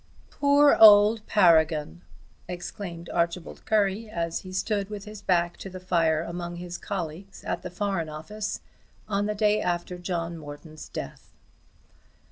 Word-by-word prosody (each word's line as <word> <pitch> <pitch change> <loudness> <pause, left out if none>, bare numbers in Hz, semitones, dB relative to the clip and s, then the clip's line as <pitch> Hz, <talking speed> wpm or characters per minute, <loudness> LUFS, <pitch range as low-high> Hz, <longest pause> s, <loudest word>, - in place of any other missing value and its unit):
"Poor 285 0 +5
old 210 0 +8
Paragon!" 160 - +3 0.5
exclaimed 175 -1 -7
Archibald 170 0 -2
Currie, 210 +1 +1
as 170 -4 -2
he 185 - -10
stood 195 +1 -1
with 205 -1 -7
his 210 -1 -9
back 175 -3 +1
to 195 - -8
the 185 0 -8
fire 165 -3 +1
among 175 0 -5
his 175 0 -7
colleagues 190 0 -6
at - - -3
the - - -6
Foreign 180 -3 -2
Office 205 +8 -5 0.5
on 205 -1 0
the 210 - -2
day 210 0 +2
after 175 0 -2
John 170 -2 -3
Morton's 155 +1 -10
death. - - -7
180 Hz, 140 wpm, -26 LUFS, 170-205 Hz, 0.5 s, old